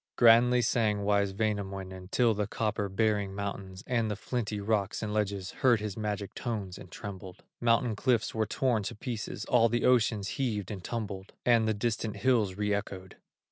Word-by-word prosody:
Grandly 120 +1 +6
sang 105 -3 +1
wise 100 -1 +2
Wainamoinen, 95 -3 -3
Till 120 +1 +3
the 105 -1 -1
copper 105 -2 -1
bearing 100 -1 0
mountains, 100 -2 -5
And 115 -3 0
the 105 - -1
flinty 110 -1 -3
rocks 100 0 -1
and 105 -1 -3
ledges 100 -3 -1
Heard 120 -4 +3
his 105 -2 -4
magic 105 -2 -3
tones 105 -7 -4
and - - -11
trembled; 95 -2 -8 0.2
Mountain 115 -1 +2
cliffs 120 0 +1
were 110 -1 0
torn 120 -1 +1
to 100 - -5
pieces, 110 0 -5
All 115 -2 +4
the 120 +1 0
ocean 115 -4 +3
heaved 105 -2 -2
and 95 -3 -6
tumbled; 100 -4 -5
And 115 -2 +4
the 110 - +1
distant 110 0 -2
hills 110 -5 +2
re 105 0 0
echoed. 95 -2 -5
105 Hz, 175 wpm, -30 LUFS, 100-115 Hz, 0.2 s, Grandly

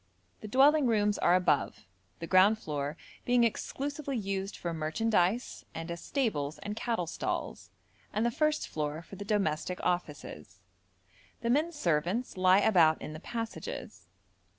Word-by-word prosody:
The - - -8
dwelling 275 +5 +5
rooms 210 -2 +2
are 175 - +4
above, 145 - +1 0.3
the 165 - -6
ground 190 +5 +5
floor 150 -5 -4 0.3
being 245 -1 +3
exclusively 280 +4 -2
used 195 -1 -3
for 170 -1 -3
merchandise 185 +7 0
and 165 +1 -5
as 170 -1 -6
stables 155 - -1
and 210 0 -4
cattle 225 -5 -1
stalls, 165 - -4 0.4
and 215 +2 0
the 235 - +2
first 305 +4 +1
floor 150 +1 -3
for 195 - -11
the 205 - -6
domestic 185 -4 -1
offices. 180 0 -3 0.8
The 235 0 0
men 305 +6 +2
servants 180 - -1
lie 185 +1 +5
about 170 -8 +5
in 155 - -7
the 155 - -7
passages. 160 - -6
195 Hz, 145 wpm, -30 LUFS, 165-235 Hz, 0.8 s, dwelling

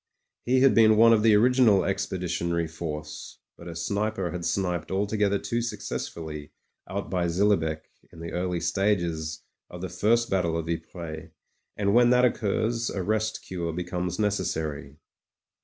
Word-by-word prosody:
He 130 +1 +3
had 135 -1 +6
been 110 -1 +6
one 115 +1 +7
of 110 - +3
the 110 -1 +5
original 120 -3 +4
Expeditionary 90 -3 -1
Force; 75 -1 -7 0.2
but 85 - -12
a 85 - -7
sniper 100 +1 -2
had 90 -1 -5
sniped 90 -5 -1
altogether 100 +1 +1
too 120 +4 -2
successfully 80 -9 -5 0.4
out 100 +2 -4
by 90 -2 0
Zillebecke 85 -4 +1 0.2
in 80 - -14
the 85 0 -6
early 90 -1 -2
stages 85 -6 -1 0.3
of 90 - -9
the 95 - -4
first 115 +5 +2
battle 85 -4 0
of 80 0 -4
Ypres, 80 -1 -6 0.5
and 100 -1 +1
when 120 +1 +6
that 125 0 +5
occurs 115 0 0
a 95 - -3
rest 110 +2 -1
cure 85 -3 -4
becomes 90 0 -3
necessary. 80 -8 -2
95 Hz, 150 wpm, -26 LUFS, 85-105 Hz, 0.5 s, one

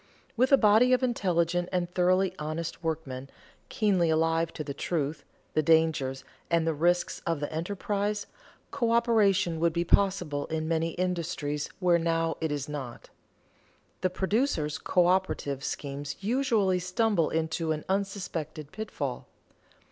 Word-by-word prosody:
With 255 +3 +2
a 275 - +8
body 225 +3 +5
of 255 - +2
intelligent 175 -7 +1
and 180 -1 0
thoroughly 185 +1 +2
honest 160 +2 -4
workmen, 135 -5 -4 0.4
keenly 190 -6 +2
alive 165 +1 +2
to 155 - -4
the 140 -1 -5
truth, 150 -1 -2 0.3
the 155 - +3
dangers, 155 -4 +2 0.3
and 170 -1 +2
the 165 - +1
risks 175 +4 +1
of 165 -3 0
the 145 +1 -4
enterprise, 205 +4 -2 0.5
coöperation 230 - +2
would 165 0 +2
be 170 0 0
possible 180 -7 +2
in 160 0 -2
many 165 0 0
industries 170 -5 -2
where 175 -2 +3
now 165 0 0
it 160 -1 -1
is 145 -1 -3
not. 135 -5 -7 0.9
The 185 - +2
producers' 190 - 0
coöperative 180 -6 +1
schemes 140 0 -4
usually 210 -4 +1
stumble 185 -1 +1
into 160 0 -1
an 155 -1 -3
unsuspected 180 -6 -3
pitfall. 145 - -5
170 Hz, 135 wpm, -28 LUFS, 155-195 Hz, 0.9 s, a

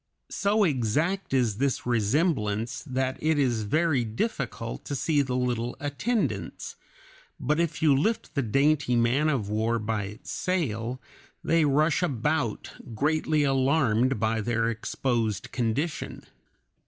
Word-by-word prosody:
So 205 +2 +2
exact 155 - 0
is 120 -6 +1
this 140 -1 0
resemblance 115 - 0
that 130 0 -1
it 155 0 +2
is 125 -6 +1
very 155 +2 +2
difficult 110 - -3
to 140 - -3
see 145 +2 +2
the 130 -2 -2
little 125 -1 -1
attendants, 145 - -2 0.6
but 150 +5 0
if 170 -1 -1
you 150 -3 +5
lift 220 +12 0
the 140 - +1
dainty 140 +2 +2
man 120 +6 +2
of 125 -9 0
war 110 +3 0
by 110 -2 -2
its 105 +4 -9
sail, 130 - -2 0.4
they 165 -1 +3
rush 155 +4 +2
about 140 -5 -1 0.2
greatly 155 +3 +1
alarmed 135 -3 +2
by 110 +1 +1
their 115 +1 0
exposed 110 -2 -2
condition. 130 +7 -2
130 Hz, 130 wpm, -27 LUFS, 115-155 Hz, 0.6 s, you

